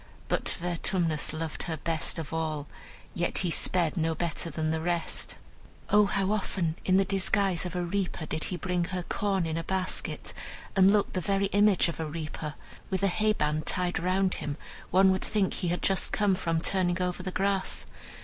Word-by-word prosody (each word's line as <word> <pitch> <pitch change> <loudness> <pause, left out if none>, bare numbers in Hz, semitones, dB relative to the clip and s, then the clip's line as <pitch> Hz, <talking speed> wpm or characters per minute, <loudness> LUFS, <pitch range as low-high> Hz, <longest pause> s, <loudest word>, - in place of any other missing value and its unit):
But - - 0
Vertumnus 170 -2 0
loved 155 0 -4
her 160 - -2
best 165 +2 0
of 160 -2 -5
all; 155 -3 -2 0.5
yet 175 0 0
he 175 - +1
sped 170 -1 +2
no 160 -1 0
better 170 0 -1
than 155 0 -1
the 160 0 -1
rest. 170 0 -1 0.6
O 210 0 +6
how 195 0 0
often, 185 -5 -1
in 185 0 +3
the 195 - +3
disguise 195 -1 +1
of 180 - -7
a 180 - 0
reaper, 175 -2 -2
did 155 0 -2
he 180 - -3
bring 180 0 -1
her 180 0 -3
corn 195 -1 0
in 160 0 -2
a 165 - -2
basket, 185 +1 -1 0.4
and 190 0 +6
looked 205 -1 +2
the 185 - -1
very 195 +2 +1
image 205 -3 +4
of 170 - -5
a 160 - -1
reaper! 155 -1 -5 0.3
With 190 0 -1
a 195 - +4
hay 215 +3 +2
band 155 -5 -1
tied 180 -1 +1
round 185 +1 +1
him, 145 -1 -3 0.3
one 190 +1 +5
would 190 - 0
think 205 -3 0
he 180 - -2
had 175 +1 -1
just 195 -1 +2
come 205 -2 +2
from 165 -3 0
turning 180 -1 +1
over 180 0 -1
the 185 - -3
grass. 195 +1 0
180 Hz, 195 wpm, -28 LUFS, 165-195 Hz, 0.6 s, O